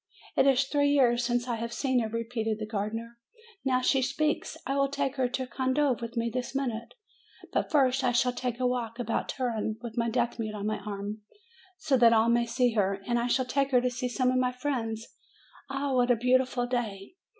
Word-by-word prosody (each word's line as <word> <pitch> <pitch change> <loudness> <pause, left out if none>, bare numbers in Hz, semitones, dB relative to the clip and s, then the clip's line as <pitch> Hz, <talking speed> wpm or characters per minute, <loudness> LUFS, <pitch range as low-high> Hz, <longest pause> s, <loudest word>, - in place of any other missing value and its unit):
"It - - +4
is 270 0 +5
three 285 +1 +1
years 245 -4 +3
since 240 0 0
I 240 -2 -1
have 230 +1 -4
seen 260 0 +1
her!" 225 -2 -1
repeated 225 -1 -2
the 215 - -4
gardener. 225 +2 -4 0.4
"Now 255 -1 +2
she 265 +1 +3
speaks! 295 +4 -1
I 275 - -1
will 275 0 +2
take 280 -1 -1
her 255 -2 +1
to 260 +1 -2
Condove 260 +1 0
with 235 +1 -6
me 230 0 0
this 255 +1 -3
minute. 235 -4 -3 0.6
But - - 0
first 270 -2 +3
I 250 - +3
shall 245 +1 +2
take 250 -1 -3
a 255 - 0
walk 240 -2 -1
about 230 -2 -2
Turin, 225 -4 -2
with 235 0 -4
my 230 0 +1
deaf 240 +1 -1
mute 215 -1 -3
on 205 -1 -4
my 215 0 -1
arm, 205 +1 -5 0.6
so 290 -7 +1
that 235 -2 +6
all 225 +1 +4
may 235 0 +2
see 245 +1 +2
her, 195 -2 +1
and 240 +2 +1
I 235 - 0
shall 260 +1 +1
take 275 +2 0
her 255 -2 +4
to 250 0 0
see 250 +1 -3
some 255 +1 +1
of 255 - +1
my 250 0 +2
friends! 240 -4 -3 0.6
Ah, 275 0 -2
what 250 -1 +3
a 245 - +5
beautiful 250 +1 +2
day! 230 - -3
245 Hz, 215 wpm, -28 LUFS, 230-260 Hz, 0.6 s, that